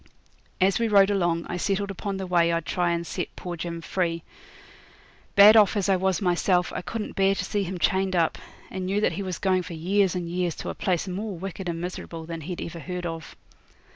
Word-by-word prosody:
As 190 +2 +3
we 230 - +2
rode 200 -2 +5
along 175 -4 +1
I 180 - -3
settled 200 +2 -1
upon 195 0 -4
the 190 - -4
way 170 -2 +3
I'd 165 -1 -1
try 175 -2 0
and 170 0 -1
set - - -4
poor 175 -1 -5
Jim 170 0 -5
free. 170 -1 -1 1.1
Bad 205 +2 +9
off 210 -1 +5
as 200 -1 0
I 195 - +5
was 190 0 +1
myself 180 0 +2
I - - -3
couldn't 215 +3 -5
bear 195 0 +3
to - - -2
see 205 - -1
him 185 -1 -3
chained 190 +1 +1
up, 165 -2 +1 0.3
and 185 -1 -4
knew 200 +2 +1
that 210 - +2
he 175 +5 -4
was 185 -2 -3
going 185 -2 +2
for 175 0 -8
years 185 +3 +1
and 175 -1 -3
years 175 -1 -1
to - - -6
a - - -3
place 185 0 -1
more 195 +1 -4
wicked 190 0 -5
and 165 -1 -3
miserable 170 -2 -6
than 165 0 -6
he'd 175 +3 -5
ever 170 0 -7
heard 180 +1 -5
of. 165 -2 -6
180 Hz, 225 wpm, -26 LUFS, 170-195 Hz, 1.1 s, Bad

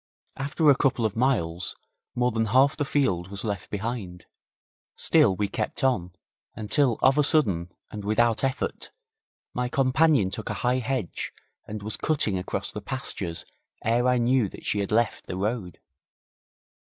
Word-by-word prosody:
After 145 +3 0
a 140 - +8
couple 125 -3 +1
of 105 - -1
miles 95 -9 0 0.4
more 125 0 +2
than 115 0 0
half 130 +5 +4
the 145 - -1
field 95 -12 +1
was 100 +1 -4
left 100 -4 -3
behind, 105 -4 -4 0.7
still 95 - +4
we 105 +1 0
kept 100 - -4
on, 90 -10 +1 0.4
until 115 +3 +1
of 135 +3 +5
a - - +5
sudden, 95 - +2 0.2
and 105 -1 -6
without 110 +3 +2
effort, 135 0 -2 0.6
my 125 0 -1
companion 135 -5 +3
took - - -5
a - - -2
high 125 +1 +3
hedge 125 -6 -3 0.4
and 105 -1 -6
was 110 +1 -4
cutting 145 -10 0
across 90 - -3
the 105 - -6
pastures 100 -8 -4 0.4
ere 120 +2 +2
I 125 0 +3
knew 120 -2 +2
that - - -12
she 105 - 0
had 100 0 -2
left 115 +1 +1
the 90 - -4
road. 100 -2 -3
115 Hz, 160 wpm, -26 LUFS, 100-130 Hz, 0.7 s, a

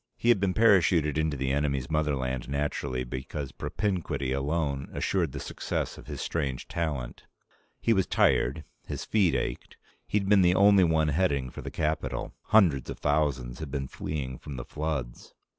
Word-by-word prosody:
He 120 - +1
had 120 -4 +5
been 95 -2 0
parachuted 90 -8 +4
into 80 -1 0
the 65 0 -1
enemy's 70 -1 -1
motherland, 70 -5 -1
naturally, 70 -2 -2
because 65 +3 -5
propinquity 90 -9 -2
alone 70 0 -1
assured 85 -7 0
the - - -6
success - - -3
of - - -13
his - - -6
strange 70 -6 -2
talent. 75 -8 -4 0.5
He 115 - +3
was 95 -3 +1
tired. 75 +5 +2 0.2
His - - -4
feet 100 -6 +2
ached. - - -3 0.3
He'd 100 -2 0
been 100 -1 +6
the 90 0 +4
only 100 -1 +6
one 80 -2 +3
heading 70 -6 +1
for - - -8
the - - -5
capital. 80 +1 -2
Hundreds 85 - +4
of - - -5
thousands 70 -5 0
had 80 - -5
been 70 -1 -3
fleeing 65 -4 -5
from 70 - -8
the - - -6
floods 75 -6 -4
75 Hz, 165 wpm, -28 LUFS, 65-85 Hz, 0.5 s, been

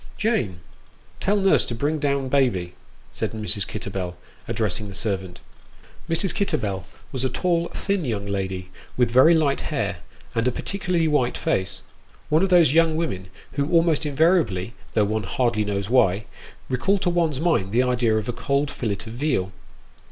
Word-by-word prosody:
" - - -23
Jane, 190 - 0 0.6
tell 200 +2 +1
nurse 195 -1 +4
to 120 - -3
bring 150 +6 0
down 140 -2 0
baby," 120 -11 +1 0.4
said - - -3
Mrs. 105 -2 -2
Kitterbell, 95 -4 -4 0.3
ad - - -2
dressing 105 -1 -1
the 100 - -8
servant. 95 -4 -3 0.7
Mrs. 170 +3 +1
Kitterbell 105 - -1 0.3
was 130 -2 -3
a 130 - +2
tall, 170 +5 0
thin 200 -3 -2
young 110 -7 -2
lady, 95 -2 -3 0.3
with 125 -2 +3
very 130 +7 +7
light 145 -4 +2
hair, 105 - -2 0.4
and 115 +1 +1
a - - +3
particularly 180 +2 -1
white 145 -5 +1
face 95 - -1 0.5
one 155 +2 +4
of 195 - +2
those 170 -6 +5
young 165 -1 +4
women 95 - -2 0.2
who 140 0 -1
almost 165 -3 +3
invariably, 145 - +2 0.2
though 105 - +4
one 110 +1 -1
hardly 110 +4 0
knows 100 -1 -2
why, 105 -4 +3 0.4
recall 165 +11 +1
to 180 -2 0
one's 165 -5 +1
mind 155 - +1
the 120 +4 +3
idea 120 -3 +2
of 110 - -2
a 120 - -1
cold 140 +3 0
fillet 110 -5 -2
of 110 - -8
veal. 120 -8 0
125 Hz, 170 wpm, -24 LUFS, 100-160 Hz, 0.7 s, very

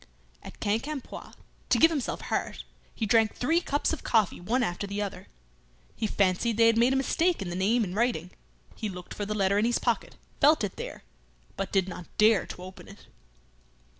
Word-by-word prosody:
At - - -12
Quincampoix, 245 +8 -3 0.4
to - - +4
give 325 - +6
himself 285 -6 -2
heart, - - -3 0.3
he 225 - -1
drank 220 +1 +3
three 325 +7 +1
cups 290 -1 0
of 320 - -5
coffee 215 -6 +1
one 245 +8 +1
after 190 0 -2
the 200 +1 -4
other. 205 -2 -5 0.7
He 220 - -1
fancied 200 +3 +1
they 230 - +6
had 230 0 +5
made 240 +2 +4
a - - +2
mistake 330 +6 +1
in 190 -4 -4
the - - -4
name 215 +6 +2
in 180 -3 -4
writing. 210 -6 0 0.4
He 215 - -4
looked 180 -2 -8
for 205 - -4
the 215 - -2
letter 200 0 +2
in 215 - +2
his 240 0 +2
pocket, - - -1 0.2
felt 305 +3 +5
it - - -3
there, - - -7 0.5
but 195 - -4
did 190 -2 +2
not 180 -2 -8
dare 215 -2 +4
to 180 - -8
open 185 0 -11
it. 200 - -14
215 Hz, 195 wpm, -28 LUFS, 195-250 Hz, 0.7 s, give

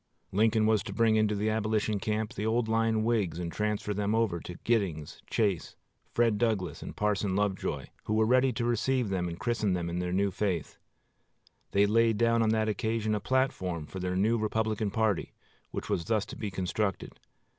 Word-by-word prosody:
Lincoln 110 +2 +3
was 110 -2 +3
to 100 - -5
bring 115 0 +3
into 110 -1 +2
the 105 +2 0
Abolition 110 -1 0
camp 110 0 -2
the 105 - -4
old 110 +1 +1
line 110 -1 +2
Whigs 110 -7 +1
and 85 -1 -3
transfer 105 0 -1
them 105 +2 0
over 110 -7 +1
to 90 - -8
Giddings, 95 -10 -1
Chase, 100 -7 0 0.4
Fred 115 -3 +2
Douglass, 100 -9 0
and - - -7
Parson 105 -2 0
Lovejoy, 100 -2 -1 0.2
who 110 - 0
were 110 0 +4
ready 130 +3 +4
to 120 +1 -2
receive 120 0 +1
them 90 -2 -1
and 85 -1 -5
christen 115 -5 0
them 85 -1 -2
in 85 - -2
their 90 0 -2
new 100 +2 +1
faith. 95 -6 -2 0.9
They 100 +1 +4
laid 115 +1 +3
down 115 +1 +3
on 110 - +3
that 110 0 +2
occasion 110 +1 0
a 105 - 0
platform 100 - 0
for 95 - -8
their 90 0 -2
new 110 +5 +2
Republican 110 0 0
party, 105 -2 0 0.4
which - - -5
was 85 - -1
thus 110 -2 +1
to - - -9
be 105 - -4
constructed. 95 +1 -2
105 Hz, 190 wpm, -29 LUFS, 95-110 Hz, 0.9 s, were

